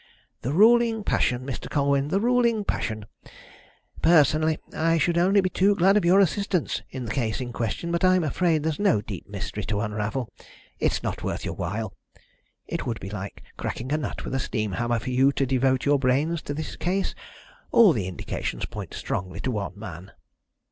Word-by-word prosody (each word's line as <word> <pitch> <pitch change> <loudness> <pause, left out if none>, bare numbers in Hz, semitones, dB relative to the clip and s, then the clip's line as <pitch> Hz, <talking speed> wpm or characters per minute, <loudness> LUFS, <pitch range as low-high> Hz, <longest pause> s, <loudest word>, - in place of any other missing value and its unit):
"The 125 - -2
ruling 225 +4 +5
passion, 125 -9 0
Mr. 135 -2 -5
Colwyn, 140 -1 +1
the 190 +6 +1
ruling 235 -1 +2
passion! 110 - -3 1.0
Personally 155 -1 +4 0.2
I 165 +1 +2
should 170 +3 +2
be 170 - +2
only 195 +3 +4
too 190 +2 +2
glad 195 +2 +4
of 210 - +3
your 180 +3 +5
assistance 195 -2 +1
in 130 -2 -6
the 110 - -4
case 115 -5 -1
in 125 -2 -5
question, 120 +9 -2
but 170 +1 -1
I'm 185 -1 +4
afraid 160 0 +1
there's 160 -1 -1
no 200 - +3
deep 100 -3 -8
mystery 105 +1 -5
to 105 -2 -1
unravel 105 +3 -3 0.5
it's - - 0
not - - -3
worth - - -3
your - - -3
while. 100 +3 -4 0.7
It - - -4
would 115 -2 -2
be 95 - -7
like 100 -1 -7
cracking 125 +3 -4
a - - +2
nut 155 - -4
with - - -5
a 135 - 0
steam 110 -5 -2
hammer 120 +3 0
for 120 +3 -4
you 135 +2 +4
to 135 - +1
devote 130 0 +1
your 145 0 +4
brains 145 +6 +1
to 145 - -3
this 155 0 -5
case. 190 +3 -1 0.6
All 215 -7 +7
the 100 -6 -2
indications 95 - -4
point - - -7
strongly 90 0 -4
to 130 - -1
one 100 -4 -4
man." 95 -3 -9
140 Hz, 190 wpm, -25 LUFS, 115-175 Hz, 1.0 s, All